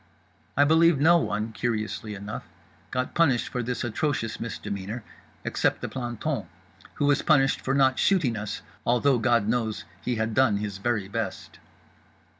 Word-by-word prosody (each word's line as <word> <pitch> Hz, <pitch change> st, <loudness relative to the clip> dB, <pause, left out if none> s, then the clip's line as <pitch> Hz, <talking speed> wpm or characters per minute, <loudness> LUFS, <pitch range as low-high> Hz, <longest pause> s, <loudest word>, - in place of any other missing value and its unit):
I 145 Hz, -, +7 dB
believe 160 Hz, 0 st, +5 dB
no 170 Hz, +4 st, +6 dB
one 105 Hz, -5 st, -2 dB
(curiously 110 Hz, -2 st, -3 dB
enough) 100 Hz, +2 st, -7 dB, 0.4 s
got 125 Hz, 0 st, -2 dB
punished 145 Hz, -8 st, +2 dB
for 125 Hz, -, -2 dB
this 120 Hz, -1 st, -3 dB
atrocious 120 Hz, -1 st, -1 dB
misdemeanour—except 105 Hz, -1 st, -4 dB
the -, -, -4 dB
planton; 120 Hz, 0 st, -3 dB, 0.5 s
who 145 Hz, -, 0 dB
was 145 Hz, -1 st, +3 dB
punished 135 Hz, -4 st, +3 dB
for 135 Hz, -, 0 dB
not 130 Hz, -1 st, +3 dB
shooting 165 Hz, -12 st, +3 dB
us, 105 Hz, -1 st, -5 dB, 0.2 s
although 125 Hz, +2 st, +3 dB
God 115 Hz, -3 st, +2 dB
knows 110 Hz, -3 st, -1 dB, 0.2 s
he 125 Hz, -, -1 dB
had 110 Hz, 0 st, -1 dB
done 115 Hz, -4 st, +4 dB
his 100 Hz, -1 st, -4 dB
very 110 Hz, -2 st, -1 dB
best. 100 Hz, -, -5 dB
120 Hz, 145 wpm, -26 LUFS, 110-135 Hz, 0.5 s, I